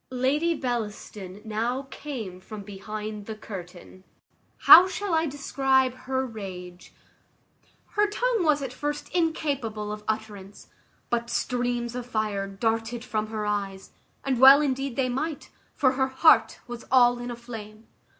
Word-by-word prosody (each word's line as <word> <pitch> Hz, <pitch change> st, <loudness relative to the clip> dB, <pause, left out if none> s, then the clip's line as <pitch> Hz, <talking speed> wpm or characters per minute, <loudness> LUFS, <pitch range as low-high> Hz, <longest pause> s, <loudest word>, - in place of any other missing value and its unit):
Lady 285 Hz, +7 st, +1 dB
Bellaston 210 Hz, -6 st, -5 dB
now 235 Hz, +5 st, -2 dB
came 225 Hz, -11 st, -6 dB
from 205 Hz, +2 st, -9 dB
behind 210 Hz, +1 st, -7 dB
the 220 Hz, -, -5 dB
curtain. 185 Hz, -3 st, -10 dB, 0.5 s
How 355 Hz, +3 st, +9 dB
shall 390 Hz, -1 st, -3 dB
I 320 Hz, 0 st, +2 dB
describe 270 Hz, -2 st, +1 dB
her 260 Hz, +1 st, -3 dB
rage? 185 Hz, -6 st, -9 dB, 1.0 s
Her 415 Hz, 0 st, +2 dB
tongue 475 Hz, +1 st, 0 dB
was 300 Hz, -3 st, +2 dB
at 260 Hz, -2 st, -5 dB
first 295 Hz, +2 st, -4 dB
incapable 275 Hz, -11 st, -1 dB
of 210 Hz, 0 st, -6 dB
utterance; 210 Hz, -3 st, -5 dB, 0.4 s
but 235 Hz, 0 st, -1 dB
streams 245 Hz, -1 st, -1 dB
of 250 Hz, -1 st, -5 dB
fire 215 Hz, -4 st, -1 dB
darted 225 Hz, +4 st, -2 dB
from 215 Hz, -2 st, -2 dB
her 215 Hz, -1 st, -4 dB
eyes, 200 Hz, -2 st, -3 dB, 0.3 s
and 260 Hz, -3 st, 0 dB
well 270 Hz, +2 st, +10 dB
indeed 270 Hz, -3 st, -1 dB
they 265 Hz, -2 st, +1 dB
might, 280 Hz, +5 st, -4 dB, 0.2 s
for 260 Hz, -3 st, +3 dB
her 265 Hz, 0 st, +1 dB
heart 265 Hz, +5 st, +4 dB
was 240 Hz, -1 st, -8 dB
all 245 Hz, -2 st, +5 dB
in 245 Hz, 0 st, -5 dB
a 240 Hz, -, -4 dB
flame. 225 Hz, -2 st, -10 dB
240 Hz, 140 wpm, -26 LUFS, 210-270 Hz, 1.0 s, well